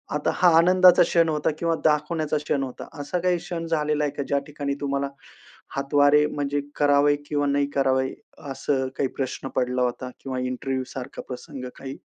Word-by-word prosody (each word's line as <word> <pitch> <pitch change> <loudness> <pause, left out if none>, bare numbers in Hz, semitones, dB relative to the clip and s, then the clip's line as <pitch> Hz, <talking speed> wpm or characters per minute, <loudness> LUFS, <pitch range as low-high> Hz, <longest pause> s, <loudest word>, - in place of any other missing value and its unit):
आता 150 - 0
हा 180 -1 +5
आनंदाचा 180 +2 +6
क्षण 165 -1 +2
होता 150 0 0
किंवा 165 -1 +1
दाखवण्याचा 155 0 +1
क्षण 145 -2 -1
होता. 130 -2 -7
असा 145 +5 -2
काही 180 0 +2
क्षण 170 -1 -5
झालेला 150 -2 0
आहे 145 - 0
का 145 - -3
ज्या 140 - +1
ठिकाणी 145 -1 -3
तुम्हाला 140 0 -1 0.7
हातवारे 145 +2 +4
म्हणजे 145 -1 -2
करावे, 145 0 +4
किंवा 145 -1 0
नाही 140 0 +1
करावे 130 -1 +1 0.4
असं 135 0 -1
काही 135 - 0
प्रश्न 135 0 -3
पडला 125 0 0
होता. 125 +1 -2
किंवा 130 -2 -4
इंटरव्ह्यू 130 +1 -2
सारखा 130 -2 -6
प्रसंग 125 +1 -7
काही 135 0 -7
145 Hz, 170 wpm, -24 LUFS, 135-150 Hz, 0.7 s, आनंदाचा